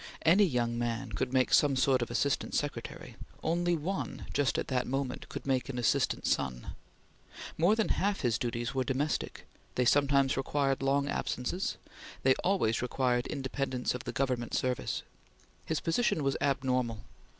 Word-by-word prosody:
Any 185 Hz, +6 st, +6 dB
young 120 Hz, -6 st, 0 dB
man 120 Hz, +1 st, -2 dB
could 125 Hz, +5 st, -2 dB
make 130 Hz, -1 st, +2 dB
some 145 Hz, -2 st, +5 dB
sort 130 Hz, -1 st, +3 dB
of 120 Hz, -, -2 dB
Assistant 140 Hz, -1 st, 0 dB
Secretary; 145 Hz, -5 st, -4 dB, 0.3 s
only 175 Hz, +1 st, +1 dB
one, 185 Hz, +6 st, -4 dB
just 140 Hz, -4 st, +1 dB
at -, -, -2 dB
that 125 Hz, -2 st, 0 dB
moment, 135 Hz, 0 st, -3 dB
could -, -, -6 dB
make 135 Hz, -1 st, 0 dB
an 130 Hz, -, -4 dB
Assistant 120 Hz, -, +1 dB
Son. 60 Hz, -2 st, -1 dB, 0.8 s
More 175 Hz, +7 st, +4 dB
than 220 Hz, -1 st, 0 dB
half 200 Hz, +1 st, 0 dB
his 115 Hz, -5 st, +1 dB
duties 120 Hz, 0 st, -2 dB
were 130 Hz, -1 st, +1 dB
domestic; 140 Hz, +3 st, -2 dB, 0.3 s
they 125 Hz, -, +2 dB
sometimes 140 Hz, 0 st, +3 dB
required 135 Hz, 0 st, 0 dB
long 140 Hz, +1 st, +2 dB
absences; 140 Hz, +7 st, -2 dB, 0.5 s
they 130 Hz, -, +6 dB
always 180 Hz, -, +2 dB
required 125 Hz, 0 st, 0 dB
independence 130 Hz, -2 st, -2 dB
of 125 Hz, -, -6 dB
the -, -, -3 dB
Government 125 Hz, -3 st, -1 dB
service. 125 Hz, -1 st, -1 dB, 0.6 s
His 160 Hz, -, 0 dB
position 165 Hz, -3 st, +1 dB
was 135 Hz, 0 st, +1 dB
abnormal. 130 Hz, -5 st, 0 dB
135 Hz, 155 wpm, -31 LUFS, 125-145 Hz, 0.8 s, Any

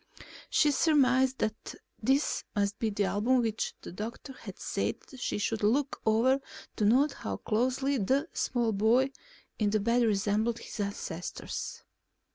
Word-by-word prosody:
She 300 Hz, -, +4 dB
surmised 265 Hz, -3 st, +3 dB
that 220 Hz, -2 st, -3 dB, 0.3 s
this 270 Hz, +6 st, +1 dB
must 200 Hz, 0 st, 0 dB
be 225 Hz, -, +1 dB
the 205 Hz, 0 st, 0 dB
album 215 Hz, +6 st, +2 dB
which 225 Hz, -2 st, -1 dB
the -, -, -7 dB
doctor 225 Hz, +8 st, -6 dB
had -, -, -10 dB
said -, -, -1 dB, 0.2 s
she -, -, -2 dB
should 215 Hz, +1 st, -1 dB
look 265 Hz, +7 st, +1 dB
over 240 Hz, +5 st, +4 dB, 0.4 s
to 210 Hz, -, +1 dB
note 265 Hz, +8 st, +4 dB
how -, -, -5 dB
closely 260 Hz, +4 st, 0 dB
the 270 Hz, -, +1 dB
small 240 Hz, -3 st, 0 dB
boy 230 Hz, +6 st, +3 dB, 0.5 s
in 210 Hz, -2 st, +2 dB
the 215 Hz, +1 st, +2 dB
bed 235 Hz, +4 st, +2 dB
resembled 215 Hz, +1 st, +1 dB
his -, -, -9 dB
ancestors. 200 Hz, -4 st, -4 dB
230 Hz, 145 wpm, -30 LUFS, 210-260 Hz, 0.5 s, She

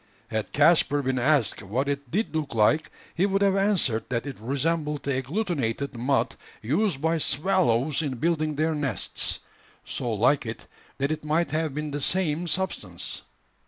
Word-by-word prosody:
Had 110 Hz, -1 st, -2 dB
Caspar 145 Hz, -1 st, +4 dB
been 130 Hz, -1 st, 0 dB
asked 135 Hz, -3 st, +2 dB
what 120 Hz, +8 st, -2 dB
it 140 Hz, -2 st, -3 dB
did 200 Hz, -, -1 dB
look 150 Hz, -6 st, -2 dB
like, 130 Hz, +9 st, +3 dB, 0.2 s
he 185 Hz, +4 st, +2 dB
would 195 Hz, 0 st, +1 dB
have 195 Hz, -1 st, +3 dB
answered 195 Hz, -, +2 dB
that 120 Hz, 0 st, -1 dB
it 140 Hz, -6 st, -6 dB
resembled 150 Hz, +4 st, -1 dB
the 140 Hz, -, 0 dB
agglutinated 140 Hz, -, -2 dB
mud 130 Hz, +4 st, 0 dB, 0.2 s
used 160 Hz, -, 0 dB
by 160 Hz, +2 st, +1 dB
swallows 145 Hz, -4 st, +2 dB
in 140 Hz, -4 st, -2 dB
building 155 Hz, +2 st, 0 dB
their 160 Hz, +2 st, +1 dB
nests 140 Hz, -9 st, -1 dB, 0.4 s
so 120 Hz, -, -3 dB
like 120 Hz, +7 st, +3 dB
it, 110 Hz, +1 st, -6 dB, 0.3 s
that 140 Hz, +2 st, 0 dB
it 155 Hz, -, -3 dB
might 155 Hz, 0 st, +1 dB
have 155 Hz, -2 st, -1 dB
been 150 Hz, 0 st, -3 dB
the 145 Hz, 0 st, -3 dB
same 170 Hz, +1 st, +1 dB
substance. 160 Hz, -, -2 dB
145 Hz, 160 wpm, -26 LUFS, 130-165 Hz, 0.4 s, Caspar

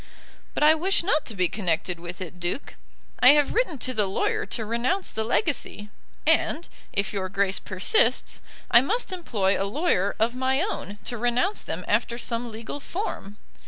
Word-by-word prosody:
"But -, -, +1 dB
I 305 Hz, +1 st, +8 dB
wish 370 Hz, +4 st, +1 dB
not 310 Hz, -5 st, +1 dB
to 225 Hz, -, -5 dB
be 185 Hz, -2 st, +2 dB
connected 175 Hz, -2 st, -1 dB
with 175 Hz, +2 st, -8 dB
it, 180 Hz, 0 st, -7 dB
Duke. 175 Hz, +10 st, -2 dB, 0.5 s
I 255 Hz, +3 st, +9 dB
have 295 Hz, -1 st, +2 dB
written 440 Hz, -, +1 dB
to 255 Hz, 0 st, -2 dB
the 210 Hz, -4 st, +1 dB
lawyer 190 Hz, -, -1 dB
to 220 Hz, -, -3 dB
renounce 245 Hz, -, 0 dB
the 220 Hz, -, -1 dB
legacy, 230 Hz, -, -1 dB, 0.3 s
and, 320 Hz, +1 st, +2 dB, 0.2 s
if 200 Hz, 0 st, -1 dB
your 190 Hz, -2 st, -2 dB
Grace 195 Hz, 0 st, 0 dB
persists, 320 Hz, -, +1 dB, 0.3 s
I 235 Hz, -, +8 dB
must 435 Hz, -, -1 dB
employ 210 Hz, -, 0 dB
a 195 Hz, -, -1 dB
lawyer 205 Hz, -, +1 dB
of 230 Hz, +3 st, +1 dB
my 260 Hz, +1 st, +1 dB
own 295 Hz, -, -3 dB
to 240 Hz, -, -4 dB
renounce 245 Hz, -, +1 dB
them -, -, -4 dB
after 235 Hz, -, +1 dB
some 235 Hz, 0 st, -1 dB
legal 225 Hz, +5 st, -6 dB
form. 280 Hz, -, -5 dB
235 Hz, 175 wpm, -25 LUFS, 200-305 Hz, 0.5 s, I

